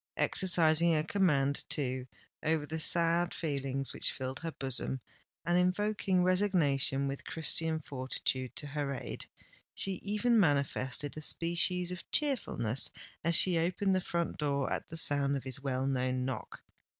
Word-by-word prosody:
Exercising 170 Hz, -2 st, +3 dB
a 155 Hz, -, +1 dB
command, 150 Hz, -7 st, +1 dB
too, 130 Hz, -3 st, -2 dB, 0.3 s
over 155 Hz, -1 st, 0 dB
the 160 Hz, +2 st, -5 dB
sad 170 Hz, +2 st, +2 dB
feelings 135 Hz, -3 st, -2 dB
which -, -, +1 dB
filled 130 Hz, 0 st, -5 dB
her 165 Hz, 0 st, -4 dB
bosom, 130 Hz, 0 st, -3 dB, 0.5 s
and 175 Hz, +1 st, +2 dB
invoking 185 Hz, 0 st, +1 dB
resignation 165 Hz, -8 st, +2 dB
with 135 Hz, 0 st, -5 dB
Christian 160 Hz, 0 st, +1 dB
fortitude 130 Hz, -2 st, -3 dB
to -, -, -4 dB
her 145 Hz, -1 st, -3 dB
aid, -, -, -5 dB, 0.5 s
she 195 Hz, -2 st, 0 dB
even 215 Hz, +3 st, +2 dB
manifested 145 Hz, -3 st, +1 dB
a -, -, -5 dB
species 175 Hz, +3 st, +2 dB
of 180 Hz, -, -8 dB
cheerfulness 225 Hz, -, 0 dB, 0.3 s
as 170 Hz, 0 st, +4 dB
she 175 Hz, -1 st, +6 dB
opened 185 Hz, +4 st, +1 dB
the 185 Hz, -, +1 dB
front 170 Hz, -1 st, -3 dB
door 140 Hz, -2 st, 0 dB
at -, -, -5 dB
the 165 Hz, -, -5 dB
sound 140 Hz, -3 st, +2 dB
of 135 Hz, -, -7 dB
his 130 Hz, +1 st, -1 dB
well 130 Hz, -1 st, -1 dB
known 130 Hz, -1 st, -1 dB
knock. 130 Hz, -3 st, -6 dB
155 Hz, 150 wpm, -31 LUFS, 135-180 Hz, 0.5 s, she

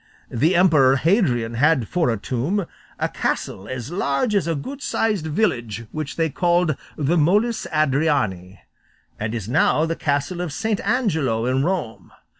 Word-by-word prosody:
The 155 Hz, +10 st, +2 dB
emperor 155 Hz, -7 st, +5 dB
Hadrian 130 Hz, -, +1 dB
had 135 Hz, -1 st, +2 dB
for 175 Hz, -6 st, +1 dB
a 115 Hz, -, 0 dB
tomb 140 Hz, -, -2 dB, 0.3 s
a -, -, 0 dB
castle 95 Hz, -, -3 dB
as 130 Hz, +2 st, -6 dB
large 175 Hz, -, 0 dB
as 200 Hz, -4 st, +1 dB
a 165 Hz, -, 0 dB
good 270 Hz, -, -6 dB
sized 210 Hz, -, -1 dB
village, 120 Hz, -, -1 dB
which 155 Hz, -2 st, -5 dB
they 165 Hz, -1 st, +1 dB
called 175 Hz, 0 st, +1 dB, 0.2 s
the 160 Hz, +3 st, +1 dB
Moles 210 Hz, +9 st, +2 dB
Adriani, 135 Hz, -, 0 dB, 0.6 s
and 110 Hz, +2 st, -3 dB
is 110 Hz, -4 st, -4 dB
now 155 Hz, +4 st, +2 dB
the 165 Hz, 0 st, -2 dB
castle 145 Hz, +4 st, -1 dB
of 175 Hz, -3 st, -3 dB
St. 220 Hz, +6 st, -1 dB
Angelo 160 Hz, -, 0 dB
in 130 Hz, +2 st, +1 dB
Rome. 160 Hz, -10 st, -3 dB
155 Hz, 155 wpm, -22 LUFS, 125-180 Hz, 0.6 s, emperor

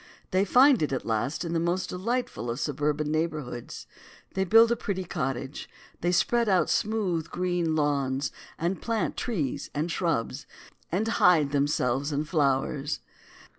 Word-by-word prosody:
They 190 Hz, +1 st, +3 dB
find 255 Hz, -, +6 dB
it 150 Hz, -, 0 dB
at 130 Hz, -, -2 dB
last 115 Hz, +9 st, -1 dB
in 170 Hz, -, -3 dB
the 165 Hz, -, +1 dB
most 175 Hz, +3 st, -1 dB
delightful 230 Hz, -, -2 dB
of 120 Hz, +3 st, -3 dB
suburban 150 Hz, 0 st, -1 dB
neighborhoods. 155 Hz, -7 st, -3 dB, 0.5 s
They 190 Hz, -, +1 dB
build 225 Hz, +4 st, +7 dB
the 235 Hz, -, +2 dB
pretty 200 Hz, -5 st, -3 dB
cottage. 135 Hz, -4 st, -4 dB, 0.3 s
They 175 Hz, -, +1 dB
spread 230 Hz, +5 st, +2 dB
out 185 Hz, -2 st, +3 dB
smooth 190 Hz, -7 st, 0 dB
green 175 Hz, -2 st, 0 dB
lawns, 140 Hz, -4 st, 0 dB, 0.3 s
and 175 Hz, +4 st, -2 dB
plant 230 Hz, -2 st, -1 dB
trees 165 Hz, -, -2 dB
and 155 Hz, +4 st, -1 dB
shrubs, 165 Hz, -, -1 dB, 0.4 s
and 200 Hz, +6 st, 0 dB
hide 170 Hz, -9 st, +4 dB
themselves 140 Hz, -1 st, +1 dB
in 145 Hz, +1 st, 0 dB
flowers. 145 Hz, -1 st, 0 dB
165 Hz, 145 wpm, -27 LUFS, 145-190 Hz, 0.5 s, build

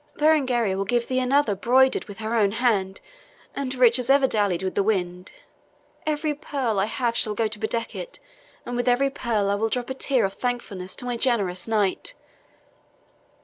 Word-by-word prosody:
Berengaria 260 Hz, -9 st, +2 dB
will 195 Hz, -, -1 dB
give 235 Hz, +3 st, 0 dB
thee 255 Hz, 0 st, 0 dB
another 255 Hz, -2 st, +2 dB
broidered 255 Hz, +6 st, +3 dB
with 205 Hz, -2 st, -10 dB
her 220 Hz, +1 st, -4 dB
own 205 Hz, -3 st, +2 dB
hand, 210 Hz, -6 st, 0 dB, 0.6 s
and 265 Hz, -2 st, -3 dB
rich 245 Hz, -1 st, +5 dB
as 250 Hz, 0 st, -3 dB
ever 275 Hz, 0 st, +5 dB
dallied 205 Hz, -7 st, +1 dB
with 190 Hz, -, -2 dB
the -, -, +1 dB
wind. 180 Hz, -3 st, -1 dB, 0.8 s
Every 305 Hz, 0 st, 0 dB
pearl 265 Hz, -7 st, -2 dB
I 195 Hz, -, +2 dB
have 235 Hz, +1 st, -2 dB
shall 215 Hz, -2 st, +1 dB
go 225 Hz, +1 st, +1 dB
to 215 Hz, 0 st, -7 dB
bedeck 230 Hz, +1 st, -2 dB
it, -, -, -7 dB, 0.5 s
and 245 Hz, -, -4 dB
with 245 Hz, 0 st, -1 dB
every 265 Hz, +3 st, +3 dB
pearl 215 Hz, -6 st, -1 dB
I -, -, +2 dB
will 220 Hz, +2 st, 0 dB
drop 250 Hz, +2 st, -3 dB
a -, -, 0 dB
tear 260 Hz, -4 st, +1 dB
of 195 Hz, -, -3 dB
thankfulness 205 Hz, -7 st, -4 dB
to 250 Hz, -, -6 dB
my 245 Hz, -1 st, -2 dB
generous 205 Hz, -8 st, 0 dB
knight." 215 Hz, -, 0 dB
235 Hz, 190 wpm, -24 LUFS, 205-255 Hz, 0.8 s, rich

